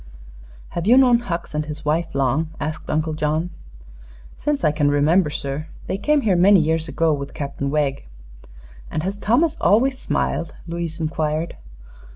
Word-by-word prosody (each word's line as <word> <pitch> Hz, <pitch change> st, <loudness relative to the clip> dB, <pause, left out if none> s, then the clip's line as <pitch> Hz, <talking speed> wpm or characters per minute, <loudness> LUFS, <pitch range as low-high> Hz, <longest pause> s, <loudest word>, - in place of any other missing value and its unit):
"Have 170 Hz, +2 st, -4 dB
you 245 Hz, +3 st, +7 dB
known 250 Hz, -3 st, +6 dB
Hucks 175 Hz, -9 st, -5 dB
and 150 Hz, 0 st, -2 dB
his 155 Hz, +1 st, -7 dB
wife 160 Hz, +2 st, 0 dB
long?" 140 Hz, +4 st, +1 dB
asked 155 Hz, +2 st, -5 dB
Uncle 155 Hz, +1 st, 0 dB
John. 155 Hz, +3 st, -1 dB, 0.8 s
"Since 295 Hz, -1 st, -2 dB
I 155 Hz, -, +4 dB
can 145 Hz, -1 st, +1 dB
remember, 150 Hz, +4 st, +3 dB
sir. 145 Hz, +1 st, -4 dB, 0.2 s
They 190 Hz, -, -3 dB
came 295 Hz, +5 st, +2 dB
here 205 Hz, -7 st, +2 dB
many 190 Hz, +3 st, +6 dB
years 160 Hz, 0 st, 0 dB
ago, 160 Hz, +1 st, +1 dB
with 140 Hz, -1 st, -5 dB
Captain 140 Hz, -1 st, -3 dB
Wegg." 140 Hz, -, -1 dB, 0.8 s
"And 155 Hz, -, -3 dB
has 195 Hz, +2 st, -2 dB
Thomas 245 Hz, +11 st, +1 dB
always 260 Hz, +5 st, +3 dB
smiled?" 165 Hz, -, -2 dB
Louise 170 Hz, -1 st, -4 dB
inquired. 155 Hz, 0 st, -2 dB
160 Hz, 160 wpm, -22 LUFS, 150-190 Hz, 0.8 s, you